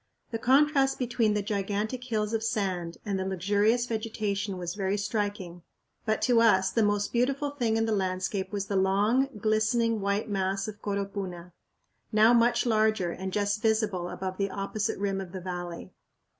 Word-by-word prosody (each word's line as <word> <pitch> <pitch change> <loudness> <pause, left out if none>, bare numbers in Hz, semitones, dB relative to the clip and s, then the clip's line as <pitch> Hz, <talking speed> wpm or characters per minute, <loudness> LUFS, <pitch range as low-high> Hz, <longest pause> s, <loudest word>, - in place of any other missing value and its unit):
The 225 - -2
contrast 270 +2 +3
between 230 -4 +1
the 205 - 0
gigantic 210 +4 -2
hills 215 -3 -1
of 225 - 0
sand 190 -6 -2
and 200 -2 -1
the - - -1
luxurious 205 +5 +1
vegetation 215 -4 -2
was 175 -1 -4
very 195 0 -1
striking; 205 -4 -3 0.5
but 220 - +1
to 240 -2 +4
us 190 -4 +4
the 230 - +1
most 205 -1 +1
beautiful 275 +4 +1
thing 235 -6 0
in 225 - +2
the 225 - -1
landscape 190 -1 -1
was 200 -2 -2
the 200 - -3
long, 205 +8 +2
glistening, 220 +1 +1
white 200 +2 0
mass 195 -1 -1
of 210 0 -8
Coropuna, 195 -3 -4 0.6
now 220 +2 +6
much 235 +1 +3
larger 215 -5 +2
and 190 +2 -5
just 205 +1 0
visible 215 -6 +1
above 185 0 -5
the 200 0 0
opposite 200 +2 -2
rim 195 -1 -1
of 185 -1 -9
the 185 - -5
valley. 175 -2 -6
205 Hz, 170 wpm, -28 LUFS, 190-225 Hz, 0.6 s, now